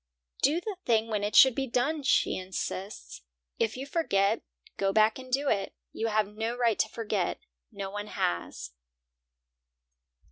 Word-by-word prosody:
"Do 300 Hz, +5 st, +3 dB
the 400 Hz, +1 st, -5 dB
thing 225 Hz, -1 st, +2 dB
when 210 Hz, -2 st, -1 dB
it 205 Hz, -, -2 dB
should 265 Hz, -2 st, +9 dB
be 270 Hz, +2 st, -2 dB
done," 275 Hz, +6 st, 0 dB
she 270 Hz, -, +2 dB
insists. 185 Hz, -, -5 dB, 0.4 s
"If 225 Hz, +1 st, 0 dB
you 265 Hz, -, -5 dB
forget, 205 Hz, -, +1 dB, 0.3 s
go 195 Hz, 0 st, +1 dB
back 215 Hz, +3 st, +3 dB
and 255 Hz, -1 st, -11 dB
do 280 Hz, +3 st, +1 dB
it. 200 Hz, -6 st, 0 dB, 0.2 s
You 225 Hz, -, -2 dB
have 215 Hz, -1 st, +2 dB
no 225 Hz, +3 st, -3 dB
right 235 Hz, -3 st, +2 dB
to 220 Hz, -, +2 dB
forget; 210 Hz, -5 st, -2 dB, 0.3 s
no 200 Hz, -2 st, -5 dB
one 205 Hz, +1 st, -5 dB
has." 85 Hz, -, -2 dB
220 Hz, 155 wpm, -29 LUFS, 200-255 Hz, 0.4 s, should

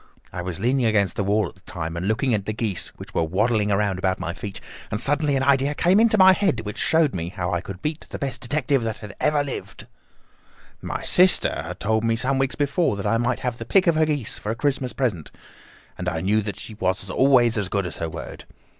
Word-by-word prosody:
I 90 Hz, -, -4 dB
was 90 Hz, 0 st, -5 dB
leaning 125 Hz, +3 st, +2 dB
against 100 Hz, -3 st, +2 dB
the 100 Hz, -, -1 dB
wall 105 Hz, 0 st, +1 dB
at -, -, -16 dB
the 95 Hz, -, -24 dB
time 85 Hz, -3 st, -5 dB
and 85 Hz, +3 st, -3 dB
looking 115 Hz, +4 st, +1 dB
at 100 Hz, -2 st, -1 dB
the 110 Hz, -, -1 dB
geese 105 Hz, -5 st, -1 dB
which -, -, -11 dB
were -, -, +1 dB
waddling 105 Hz, +6 st, +1 dB
about 100 Hz, -2 st, 0 dB
round 95 Hz, 0 st, +1 dB
my 90 Hz, -2 st, -3 dB
feet, 100 Hz, +1 st, -6 dB, 0.3 s
and 105 Hz, -, -2 dB
suddenly 145 Hz, +2 st, +1 dB
an 135 Hz, -, +1 dB
idea 140 Hz, +1 st, +2 dB
came 180 Hz, +7 st, +4 dB
into 225 Hz, -1 st, +4 dB
my 190 Hz, -1 st, +8 dB
head 185 Hz, -, +1 dB
which 105 Hz, -1 st, -6 dB
showed 160 Hz, -4 st, +3 dB
me 85 Hz, -1 st, -3 dB
how 90 Hz, -1 st, -3 dB
I 85 Hz, -, 0 dB
could 95 Hz, 0 st, -9 dB
beat 150 Hz, +1 st, -3 dB
the -, -, -5 dB
best 140 Hz, -3 st, -4 dB
detective 135 Hz, +1 st, 0 dB
that 110 Hz, -2 st, -5 dB
ever 150 Hz, -1 st, +2 dB
lived. 140 Hz, -, -7 dB, 1.0 s
"My -, -, -4 dB
sister 185 Hz, +1 st, +4 dB
had -, -, -7 dB
told 110 Hz, +1 st, 0 dB
me 115 Hz, 0 st, +2 dB
some 130 Hz, +3 st, 0 dB
weeks 135 Hz, 0 st, 0 dB
before 145 Hz, -, +1 dB
that 100 Hz, -, -5 dB
I 115 Hz, -, +2 dB
might 120 Hz, +1 st, 0 dB
have 125 Hz, -2 st, -3 dB
the -, -, -4 dB
pick 185 Hz, -, +3 dB
of 170 Hz, -, +4 dB
her 155 Hz, 0 st, +2 dB
geese 145 Hz, -7 st, -2 dB
for 105 Hz, -, -5 dB
a -, -, -2 dB
Christmas 135 Hz, 0 st, 0 dB
present, 105 Hz, -, -2 dB, 0.7 s
and 90 Hz, 0 st, -1 dB
I 80 Hz, -2 st, -3 dB
knew 105 Hz, +4 st, +2 dB
that 105 Hz, -1 st, -5 dB
she 110 Hz, -, -7 dB
was 95 Hz, -2 st, -2 dB
always 120 Hz, +1 st, +4 dB
as 100 Hz, -2 st, -2 dB
good 100 Hz, -1 st, -1 dB
as 85 Hz, -, -5 dB
her 80 Hz, -, -3 dB
word. 80 Hz, -, -8 dB
110 Hz, 240 wpm, -23 LUFS, 95-140 Hz, 1.0 s, my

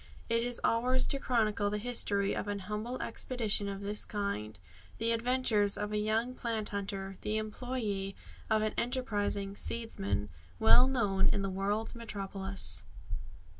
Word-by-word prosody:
It 230 Hz, 0 st, +3 dB
is 245 Hz, 0 st, 0 dB
ours 250 Hz, +3 st, +3 dB
to 275 Hz, -, 0 dB
chronicle 215 Hz, -5 st, +1 dB
the 210 Hz, +4 st, -2 dB
story 200 Hz, -3 st, +2 dB
of -, -, -3 dB
an 205 Hz, 0 st, -1 dB
humble 215 Hz, +5 st, -3 dB
expedition 215 Hz, -5 st, +2 dB
of 195 Hz, 0 st, -5 dB
this 205 Hz, +1 st, -2 dB
kind 200 Hz, -, -3 dB, 0.4 s
the 225 Hz, +1 st, +1 dB
adventures 230 Hz, -3 st, +2 dB
of 210 Hz, 0 st, -2 dB
a 210 Hz, -, +1 dB
young 220 Hz, +4 st, +1 dB
plant 225 Hz, -4 st, -2 dB
hunter, 195 Hz, -1 st, -4 dB
the 215 Hz, +1 st, -1 dB
employe 215 Hz, -3 st, -3 dB, 0.3 s
of 220 Hz, -1 st, +3 dB
an 215 Hz, -, 0 dB
enterprising 205 Hz, -5 st, -1 dB
"seedsman" 105 Hz, -, -2 dB, 0.3 s
well 240 Hz, +3 st, +7 dB
known 205 Hz, -7 st, +2 dB
in 200 Hz, -, +2 dB
the 195 Hz, -, -1 dB
world's 205 Hz, +4 st, -1 dB
metropolis. 195 Hz, -, -1 dB
210 Hz, 145 wpm, -32 LUFS, 200-235 Hz, 0.4 s, well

